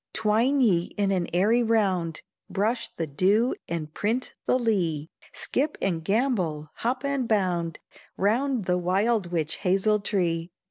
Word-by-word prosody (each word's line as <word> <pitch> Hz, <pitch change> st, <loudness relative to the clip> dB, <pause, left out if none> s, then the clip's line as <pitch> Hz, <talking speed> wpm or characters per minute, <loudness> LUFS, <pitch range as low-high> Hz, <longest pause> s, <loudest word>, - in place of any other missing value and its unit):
Twine 225 Hz, +6 st, +2 dB
ye 180 Hz, -8 st, +3 dB
in 200 Hz, -1 st, +1 dB
an 180 Hz, -3 st, 0 dB
airy 210 Hz, +7 st, +3 dB
round, 195 Hz, -8 st, +1 dB, 0.3 s
Brush 220 Hz, +5 st, 0 dB
the 165 Hz, -, -2 dB
dew 195 Hz, -, +2 dB, 0.2 s
and 155 Hz, -2 st, -4 dB
print 230 Hz, +5 st, -1 dB
the 255 Hz, -, +4 dB
lea; 175 Hz, -, 0 dB, 0.2 s
Skip 295 Hz, +3 st, -1 dB
and 165 Hz, -4 st, -1 dB
gambol, 185 Hz, -, 0 dB
hop 250 Hz, +3 st, -1 dB
and 280 Hz, -3 st, 0 dB
bound, 180 Hz, -6 st, 0 dB, 0.4 s
Round 235 Hz, +3 st, +1 dB
the 180 Hz, 0 st, +1 dB
wild 195 Hz, +3 st, +1 dB
witch 160 Hz, -2 st, -1 dB
hazel 195 Hz, +3 st, +2 dB
tree. 175 Hz, -5 st, -1 dB
200 Hz, 140 wpm, -26 LUFS, 170-230 Hz, 0.4 s, the